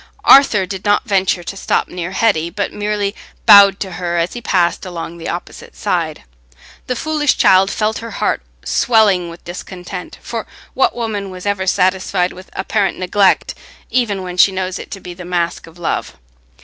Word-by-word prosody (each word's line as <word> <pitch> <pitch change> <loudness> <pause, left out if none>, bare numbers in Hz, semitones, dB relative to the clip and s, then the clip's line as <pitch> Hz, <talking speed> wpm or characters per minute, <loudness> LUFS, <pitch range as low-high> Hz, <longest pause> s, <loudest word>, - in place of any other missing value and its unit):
Arthur 230 -8 +6
did 190 0 -6
not 205 +3 +2
venture 190 -4 +1
to 195 - -6
stop 195 - 0
near 180 -1 -5
Hetty, 190 -5 +1
but 200 +3 -3
merely 205 -1 -1 0.3
bowed 200 -2 +8
to 190 - -3
her 175 -1 -3
as 170 +1 0
he 240 - -6
passed 180 -6 +1
along 170 -2 -7
the 165 - -5
opposite 175 - -7
side. - - -2 0.6
The 250 - -1
foolish 300 +1 0
child 190 +1 +5
felt 215 +1 -1
her 230 - -7
heart - - -1 0.2
swelling 205 -7 +3
with 170 +1 -12
discontent; 180 +1 -8
for 230 -2 -6 0.3
what 265 - +2
woman 215 -4 -3
was 185 0 -9
ever 200 -2 -1
satisfied 185 0 +1
with 185 +1 -13
apparent 195 +1 -1
neglect, 190 +1 +2 0.4
even 210 -7 0
when 180 -1 -6
she 195 - +6
knows 185 -1 -3
it - - -9
to 195 - -7
be 180 -1 -9
the 180 +1 -10
mask 175 -1 -2
of 165 +1 -16
love? 175 - -3
190 Hz, 175 wpm, -17 LUFS, 180-205 Hz, 0.6 s, bowed